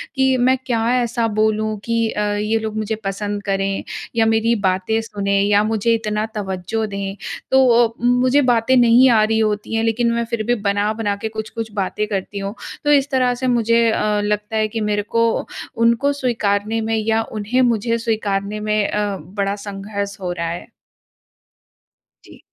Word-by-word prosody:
कि 265 0 +3
मैं 260 +2 +3
क्या 230 -3 0 0.2
ऐसा 235 -1 0
बोलूँ 215 0 0
कि 230 -1 0
अ, 210 - -2
ये 210 +2 0
लोग 220 -1 -4
मुझे 215 0 -2
पसंद 205 +1 -3
करें 195 0 -1 0.3
या 225 - +3
मेरी 225 +1 +2
बातें 190 +4 0
सुने 200 -2 -1
या 205 +1 +3
मुझे 220 +1 +1
इतना 215 -1 -1
तवज्जो 195 +2 -3
दें। 200 -1 -4 0.4
तो 265 0 +6
ओ 235 0 +5 0.2
मुझे 250 +3 +4
बातें 245 -1 +3
नहीं 245 +2 +6
आ 220 -2 +5
रही 220 +1 +1
होती 215 0 -1
हैं, 225 - +1
लेकिन 230 +1 +1
मैं 235 0 0
फिर 230 -1 -3
भी 240 +3 +1
बना-बना 205 0 -1
के 220 - -2
कुछ-कुछ 220 0 -6
बातें 205 +1 -1
करती 200 0 -4
हूँ। 195 +1 -4 0.3
तो 295 - +2
इस 280 -1 +3
तरह 255 -2 +2
से 255 +1 -3
मुझे 230 -1 +3
अ, 210 -1 0
लगता 210 +1 -2
है 215 0 +2
कि 225 +1 -4
मेरे 210 -1 0
को 230 +2 0 0.3
उनको 235 +5 +3
स्वीकारने 225 -4 -1
में 225 0 -1
या 220 +1 +1
उन्हें 220 +4 0
मुझे 230 -1 +1
स्वीकारने 210 -2 -2
में 215 -1 0
अ, 205 -1 -1
बड़ा 195 +4 -3
संघर्ष 200 0 -5
हो 180 -1 -2
रहा 170 -1 -3
है। 170 +1 -6 1.6
जी। - - -16
220 Hz, 175 wpm, -20 LUFS, 205-230 Hz, 1.6 s, तो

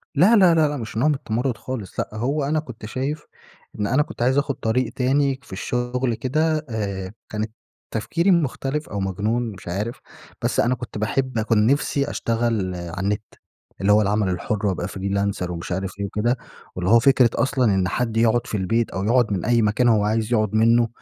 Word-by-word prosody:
لا 195 +11 +6
لا 185 -5 +6
لأ، 150 -2 +2
مش 110 -2 -6
نوع 135 +6 +3
من 150 - +4
التمرُّد 120 -2 -2
خالص 115 -7 -6
لأ، - - -1
هو 135 +7 -1
أنا 155 +2 +1
كنت 125 -8 -9
شايف 135 +6 -3 0.6
إن 105 - 0
أنا 135 +6 +3
كنت - - -10
عايز 130 +3 +3
أخد 140 -1 +1
طريق 115 +1 -1
تاني 135 +1 +1
في - - -12
الشغل 125 +3 -1
كده 155 +6 0
آآ، 100 -3 -3 0.2
كان 110 0 -2 0.5
تفكيري 170 - +1
مختلف 150 -2 0
أو 100 - -3
مجنون 105 +5 -1
مش 95 -3 -12
عارف، 105 +7 -3 0.4
بس - - 0
أنا 125 +1 +3
كنت 120 -3 -7
باحب 125 +3 -1
كان 110 -1 +2
نفسي 140 +1 +1
أشتغل 115 -5 -1
على 85 -1 -6
النت، 100 +2 -1 0.6
اللي 100 +2 +3
هو 105 +1 +6
العمل 105 -1 +1
الحُر 100 +4 -2
وأبقى 90 -1 -1
freelancer 100 -1 -2
ومش 85 0 -6
عارف 95 +1 -2
إيه 100 - -1
وكده، 115 +5 0 0.4
واللي 90 0 -1
هو 115 - +8
فكرة 130 -2 +5
أصلًا 130 -2 +1
إن 95 -1 +1
حد 115 0 -1
يقعد 115 +1 +2
في 105 - -2
البيت، 115 +5 0
أو 95 - -3
يقعد 115 -1 +2
من 95 - -2
أي 120 0 +3
مكان 110 +3 +2
هو 110 -3 +4
عايز 110 +2 0
يقعد 110 -2 +1
منه 115 +1 +4
115 Hz, 195 wpm, -23 LUFS, 105-130 Hz, 0.6 s, هو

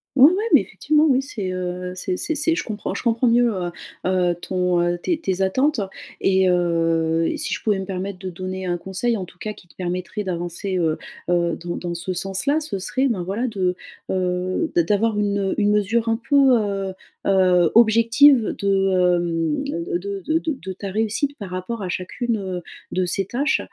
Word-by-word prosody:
Ouais, 280 +4 +8
ouais, 390 +4 0
mais - - +8
effectivement, 305 0 +1
oui, 265 -2 +3
c'est, 210 -9 -4
heu, 180 0 -4
c'est 185 0 -2
c'est 315 - -1
c'est 310 +3 +2
je - - -2
comprends 215 -2 -4
je - - -5
comprends 235 +1 +2
mieux, 240 +1 +4
heu 180 -3 -2 0.4
heu, 180 -1 +2
ton, 180 -1 0
heu, 175 0 +1
tes 310 - -1
tes 195 - -2
attentes 260 +7 +2 0.4
et 190 -1 +3
heu, 165 -2 +1
et - - -2
si - - -2
je - - -3
pouvais 210 -3 +1
me 190 - -4
permettre 190 0 -4
de 190 -1 -5
donner 185 +1 -5
un 175 -1 -1
conseil, 195 +6 -1
en 190 - -4
tout 180 - -18
cas, 215 - -4
qui 190 - -14
te - - -23
permettrait 185 +3 -3
d'avancer, 175 +1 -3
heu 160 -3 +1 0.3
heu 170 -2 +1
dans 175 0 -4
dans 175 -1 -4
ce 175 +2 -3
sens-là, 195 - 0
ce 300 -11 -4
serait, 260 +8 0
ben 190 -7 -1
voilà, 205 +8 -2
de, 185 -5 -1 0.3
heu, 185 0 -1
d'a 170 - +3
d'avoir 210 +4 +1
une 200 -2 0
une 205 -1 +3
mesure 215 +3 +1
un 225 - +2
peu, 285 - +3 0.2
heu 195 -3 -2 0.3
heu, 180 -3 +4
objective 230 +3 +5
de, 200 - -3 0.5
hem, 165 - -1
de 350 +6 -3
de 315 +1 +2
de 320 -2 -2
de 190 -8 -7
ta 195 +1 -6
réussite, 225 +7 -1
par 200 -4 -6
rapport 185 +5 -4
à 185 - -3
chacune, 220 +6 -2
heu, 185 -3 -4 0.3
de 185 - +1
ces 190 +2 0
tâches. 260 - 0
190 Hz, 200 wpm, -22 LUFS, 180-230 Hz, 0.5 s, Ouais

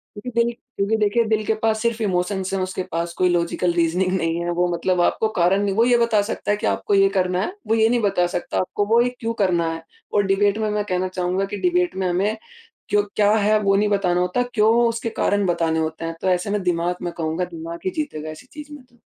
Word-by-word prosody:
क्योंकि 210 +5 -7
दिल 235 0 +1 0.3
क्योंकि 200 +3 +1
देखिए 215 +2 +2
दिल 215 -1 +1
के 220 - +2
पास 220 -1 +1
सिर्फ़ 235 -1 -1
इमोशंस 190 0 -1
है 195 - 0
उसके 185 0 -3
पास 170 +1 -2
कोई 180 -1 +3
लॉजिकल 175 0 0
रीज़निंग 175 +2 +1
नहीं 165 0 -1
है, 175 - -2
वो 175 +1 +1
मतलब 175 +1 0
आपको 220 +5 +2
कारण 190 +4 +3
नहीं 195 -1 -1
वो 230 +2 +4
ये 245 -1 +4
बता 230 -3 +3
सकता 205 0 -3
है 205 - +1
कि - - -4
आपको 100 - -1
ये 195 0 +5
करना 180 0 +1
है, 365 - -4
वो 225 - +2
ये 220 0 +4
नहीं 240 0 +2
बता 180 -4 +1
सकता 175 - -4
आपको, 205 +2 -1
वो 230 +3 +4
ये 245 - +2
क्यों 230 0 -2
करना 170 -3 +1
है? 165 0 -8 0.3
और 205 - +3
डिबेट 200 +1 +2
में, 215 -1 -1
मैं 210 0 -1
कहना 185 0 -1
चाहूँगा 185 +1 -1
कि 205 +1 -6
डिबेट 180 0 +1
में 190 -1 -1
हमें 200 +5 0 0.5
क्यों 205 0 +3
क्या 205 0 +4
है 215 0 +3
वो 195 0 +3
नहीं 210 +1 +2
बताना 185 -3 +1
होता, 180 +7 0
क्यों 220 +1 +4
हो 235 0 +4
उसके 230 0 -3
कारण 205 -1 +2
बताने 165 -2 0
होते 160 +1 -3
हैं। 165 0 -3
तो 190 - -1
ऐसे 180 +2 0
मैं 205 -1 -1
दिमाग 175 0 0
में 175 -1 -3
कहूँगा 165 +2 -1
दिमाग 170 -1 -7
ही 185 - 0
जीतेगा 155 - -5
ऐसी 220 +11 -11
चीज़ 300 0 -10
में 285 -3 -11
तो। 240 -2 -29
195 Hz, 250 wpm, -22 LUFS, 175-215 Hz, 0.5 s, ये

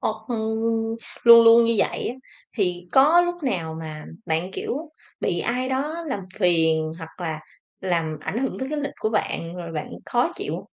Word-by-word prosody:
ơ, - - +1 0.2
ừm, 225 0 -1 0.3
luôn 235 0 +10
luôn 230 +1 +8
như 230 0 +2
vậy - - 0
á, 240 - -4 0.4
thì 180 -3 -1
có 300 +6 +6
lúc 350 0 0
nào 170 - -2
mà 155 -1 -7 0.2
bạn, 165 +3 -1
kiểu, 270 - -3 0.4
bị - - 0
ai 255 +2 -1
đó 300 +6 -2
làm 205 - -2 0.2
phiền, 160 -3 +2
hoặc 160 +2 -11
là 160 -3 -3 0.4
làm 165 -4 -1
ảnh 220 - -3
hưởng 265 0 -2
tới 265 0 -3
cái 305 - -2
lịch 285 -1 -3
của 215 - +1
bạn, 170 -5 -2
rồi 170 -2 -6
bạn 155 -2 -5
khó - - +1
chịu - - -4
không? - - -8
220 Hz, 190 wpm, -24 LUFS, 165-250 Hz, 0.4 s, luôn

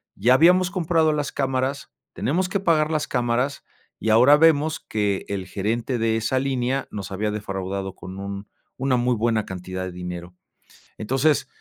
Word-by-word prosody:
ya 120 +6 +4
habíamos 180 +6 +5
comprado 165 -4 +2
las 150 -2 -2
cámaras, 135 0 -2 0.2
tenemos 180 +7 0
que 200 -1 -1
pagar 155 -5 +2
las 155 -2 -1
cámaras, 125 +3 0 0.4
y 110 - +1
ahora 125 +7 +7
vemos 155 0 +3
que 105 -3 -2
el 100 -2 -3
gerente 115 +6 -2
de 115 0 +1
esa 115 +4 0
línea 130 0 -1
nos 100 -3 -6
había 105 +2 -1
defraudado 95 -2 -4
con 95 +1 -9
un 100 +1 -6 0.3
una 130 -1 +1
muy 125 +1 +1
buena 110 -1 0
cantidad 95 0 -6
de 95 - -5
dinero. 90 0 -7 0.6
Entonces, 135 +7 +1
120 Hz, 160 wpm, -23 LUFS, 100-145 Hz, 0.6 s, ahora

